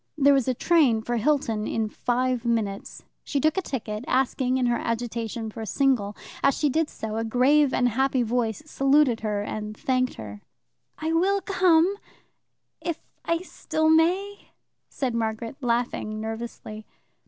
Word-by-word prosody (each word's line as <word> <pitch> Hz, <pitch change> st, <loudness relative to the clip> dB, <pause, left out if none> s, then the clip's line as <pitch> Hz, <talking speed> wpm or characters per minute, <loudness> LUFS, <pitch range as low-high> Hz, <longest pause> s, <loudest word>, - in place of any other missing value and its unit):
There 285 Hz, -1 st, +5 dB
was 270 Hz, -3 st, +2 dB
a 255 Hz, -, +1 dB
train 265 Hz, -8 st, +3 dB
for 240 Hz, +1 st, -1 dB
Hilton 230 Hz, -4 st, 0 dB
in 225 Hz, -1 st, -1 dB
five 250 Hz, +2 st, -1 dB
minutes. 220 Hz, -4 st, -2 dB, 0.2 s
She 285 Hz, -, -1 dB
took 310 Hz, +2 st, +2 dB
a 380 Hz, -, +1 dB
ticket, 225 Hz, -, -4 dB
asking 260 Hz, -2 st, +1 dB
in 255 Hz, -, +1 dB
her 240 Hz, -1 st, +1 dB
agitation 230 Hz, -1 st, -3 dB
for 225 Hz, -, -8 dB
a 220 Hz, -, -5 dB
single. 215 Hz, -3 st, +1 dB, 0.2 s
As 275 Hz, -1 st, +3 dB
she 295 Hz, -, +2 dB
did 320 Hz, +3 st, +1 dB
so, 220 Hz, 0 st, -5 dB
a 225 Hz, -, -1 dB
grave 260 Hz, +5 st, +3 dB
and 245 Hz, -, +2 dB
happy 260 Hz, +2 st, +1 dB
voice 235 Hz, +1 st, -1 dB
saluted 275 Hz, -4 st, +3 dB
her 210 Hz, -2 st, -2 dB
and 215 Hz, 0 st, -5 dB
thanked 255 Hz, -1 st, 0 dB
her. 105 Hz, -1 st, -9 dB, 0.6 s
"I 320 Hz, +1 st, -2 dB
will 385 Hz, +4 st, +2 dB
come 370 Hz, -1 st, +3 dB, 0.9 s
if 335 Hz, -2 st, -2 dB, 0.3 s
I 335 Hz, +1 st, 0 dB
still 315 Hz, -3 st, 0 dB
may," 370 Hz, +6 st, +1 dB, 0.4 s
said 260 Hz, -4 st, -2 dB
Margaret, 225 Hz, +2 st, -3 dB
laughing 235 Hz, -3 st, -1 dB
nervously. 220 Hz, -1 st, -6 dB
250 Hz, 155 wpm, -25 LUFS, 225-295 Hz, 0.9 s, There